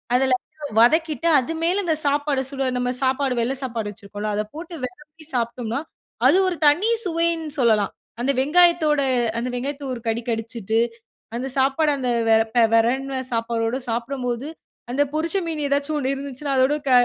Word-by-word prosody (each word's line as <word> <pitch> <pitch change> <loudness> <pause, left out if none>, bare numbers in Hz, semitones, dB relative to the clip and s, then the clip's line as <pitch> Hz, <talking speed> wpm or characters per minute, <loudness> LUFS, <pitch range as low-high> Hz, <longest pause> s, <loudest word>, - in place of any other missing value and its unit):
அதுல 260 0 +3 0.5
வதக்கிட்டு, 315 +6 +3
அது 265 +5 -3
மேல 360 +4 +2
அந்த 320 -2 +2
சாப்பாடு 285 -1 +1
சுட 270 -1 -2
நம்ம 250 0 0
சாப்பாடு 265 0 +1
வெள்ளை 250 +4 0
சாப்பாடு 230 -4 -3
வெச்சிருக்கோம்ல, 205 +1 -6
அத 210 - 0
போட்டு 340 +2 -7
வெரவி 300 +5 -11
சாப்பிட்டோம்னா, 235 0 -2 0.5
அது - - +5
ஒரு 350 - -4
தனி 345 +10 +4 0.2
சுவைன்னு 335 -2 0
சொல்லலாம். 220 -5 +3 0.3
அந்த 265 +3 +2
வெங்காயத்தோட 315 0 +4 0.4
அந்த 240 - -2
வெங்காயத்த 275 +3 -4
ஒரு 240 - -6
கடி 225 +1 -1
கடிச்சிட்டு, 225 -1 -2 0.6
அந்த 255 +2 -3
சாப்பாடு 275 +3 +3
அந்த 255 -2 -2 0.2
வெ 225 - +7 0.4
வெரவுன 260 +4 +1
சாப்பாடோடு 230 +1 -1
சாப்பிடும்போது 245 +2 -3 0.4
அந்த 270 +3 +1
பொரிச்ச 325 +4 -1
மீன் 325 -2 -3
ஏதாச்சும் 285 +2 0
ஒண்ணு 265 -2 -1
இருந்துச்சுன்னா 275 0 -4
அதோடு 260 +3 +4
க - - +2
270 Hz, 150 wpm, -22 LUFS, 235-300 Hz, 0.6 s, வெ